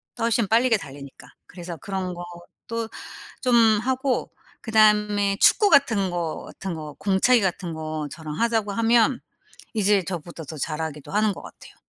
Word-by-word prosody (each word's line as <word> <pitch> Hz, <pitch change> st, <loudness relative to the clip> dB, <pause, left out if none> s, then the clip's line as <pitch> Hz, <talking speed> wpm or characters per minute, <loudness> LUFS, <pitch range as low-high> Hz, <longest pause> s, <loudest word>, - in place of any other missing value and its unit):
더 235 Hz, -, -5 dB
훨씬 230 Hz, -2 st, +1 dB
빠르게 230 Hz, +1 st, +3 dB
달리니까. 140 Hz, -5 st, -11 dB, 0.2 s
그래서 175 Hz, -2 st, -8 dB
그런 185 Hz, +2 st, -4 dB
것도 175 Hz, +6 st, -7 dB, 0.5 s
좀 250 Hz, -2 st, +2 dB, 0.3 s
하고 260 Hz, +1 st, -1 dB, 0.3 s
그다음에 210 Hz, -2 st, +3 dB
축구 415 Hz, -, +5 dB
같은 220 Hz, -, +3 dB
거 170 Hz, -3 st, -3 dB
같은 190 Hz, -3 st, -6 dB
거 150 Hz, -2 st, -8 dB
공차기 205 Hz, +5 st, +3 dB
같은 180 Hz, -3 st, -2 dB
거 155 Hz, -1 st, -4 dB
저랑 155 Hz, -2 st, -7 dB
하자고 225 Hz, -3 st, +1 dB
하면 230 Hz, +3 st, +3 dB, 0.5 s
이제 205 Hz, -2 st, +2 dB
저보다 170 Hz, -2 st, -6 dB
더 155 Hz, +2 st, -8 dB
잘하기도 155 Hz, -1 st, -4 dB
하는 210 Hz, 0 st, +2 dB
것 -, -, -10 dB
같아요. -, -, -14 dB
195 Hz, 310 characters per minute, -24 LUFS, 170-225 Hz, 0.5 s, 축구